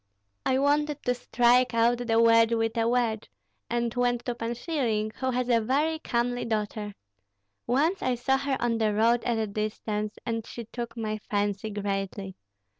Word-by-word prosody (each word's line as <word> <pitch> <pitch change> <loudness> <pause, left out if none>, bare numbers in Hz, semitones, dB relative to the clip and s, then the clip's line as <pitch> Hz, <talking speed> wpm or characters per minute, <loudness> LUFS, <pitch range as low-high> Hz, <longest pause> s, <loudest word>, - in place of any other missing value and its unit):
I 260 - +3
wanted 290 +1 +1
to 250 - +2
strike 245 0 +3
out 235 +1 +3
the 225 -1 +3
wedge 230 0 +5
with 225 0 0
a 230 0 +2
wedge, 235 -3 0 0.4
and 235 -1 -1
went 245 -1 0
to 245 - -1
Pan 235 0 -4
Schilling, 235 -7 -1
who 260 - 0
has 250 -1 0
a 235 -2 +3
very 295 +7 +1
comely 245 -3 -1
daughter. 210 -2 -3 0.7
Once 310 +10 +2
I 255 -1 +1
saw 265 +3 +1
her 275 -1 -1
on 230 -1 0
the 215 -2 +1
road 230 +2 +3
at 235 -2 +1
a 220 - 0
distance, 210 0 -3
and 230 -2 -2
she 235 +1 -8
took 235 +1 -6
my 215 -1 -2
fancy 205 +1 -1
greatly. 195 -1 -3
235 Hz, 175 wpm, -27 LUFS, 215-245 Hz, 0.7 s, wedge